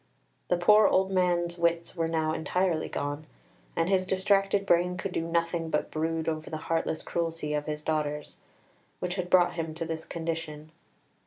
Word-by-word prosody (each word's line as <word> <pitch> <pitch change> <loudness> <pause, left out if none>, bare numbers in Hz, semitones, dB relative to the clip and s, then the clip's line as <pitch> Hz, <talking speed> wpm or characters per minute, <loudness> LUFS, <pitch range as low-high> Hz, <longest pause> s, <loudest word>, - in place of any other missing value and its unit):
The 175 - +2
poor 210 +4 +6
old 190 +1 +2
man's 175 -2 +1
wits 170 +1 0
were 165 -2 0
now 160 -1 0
entirely 175 0 0
gone, 145 +2 -4 0.5
and 165 0 +1
his 185 -1 +2
distracted 195 +1 +2
brain 180 0 +2
could 185 +1 -3
do - - -1
nothing 170 0 0
but 150 -1 -1
brood 160 +1 -1
over 155 -1 -2
the 155 - -3
heartless 160 0 -2
cruelty 165 -3 -2
of 150 0 -2
his 150 0 -4
daughters, 150 -1 -2 0.6
which 180 -1 -2
had 180 -2 -3
brought 180 -1 +5
him 165 -2 -4
to 165 0 -3
this 160 0 -4
condition. 160 -2 -5
165 Hz, 170 wpm, -28 LUFS, 160-180 Hz, 0.6 s, poor